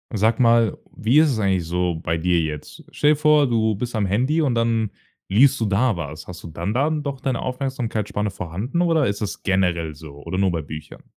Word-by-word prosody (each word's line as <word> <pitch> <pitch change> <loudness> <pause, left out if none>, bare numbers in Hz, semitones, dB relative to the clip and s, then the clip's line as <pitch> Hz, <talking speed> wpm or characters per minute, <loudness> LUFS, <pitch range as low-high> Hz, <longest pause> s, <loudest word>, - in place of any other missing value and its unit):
Sag 110 +4 +2
mal, 115 -4 +4 0.2
wie 120 +8 +3
ist 155 -1 +5
es 120 - -1
eigentlich 95 -4 +1
so 90 +1 0
bei 80 +1 0
dir 85 +1 +2
jetzt? 75 -2 -5
Stell 150 - +3
dir - - +4
vor, 150 -1 +4
du 110 -3 +1
bist 120 +4 -4
am 105 -3 +1
Handy 130 - +1
und 135 -6 +1
dann 115 -2 +1 0.4
liest 130 +7 +4
du 110 - 0
da 105 +3 +2
was. 75 -1 -6
Hast 90 -1 -9
du - - -7
dann 85 +5 -4
da 140 +5 +2
doch 145 -4 -3
deine 130 -3 -1
Aufmerksamkeitsspanne 120 -6 -2
vorhanden 100 - -3
oder 165 -4 +3
ist 100 +1 -2
das 100 -2 -4
generell 90 -4 0
so 75 -1 -12
oder 95 - -3
nur 95 -1 +3
bei 80 -2 -3
Büchern? 75 +1 -9
110 Hz, 215 wpm, -22 LUFS, 90-130 Hz, 0.4 s, ist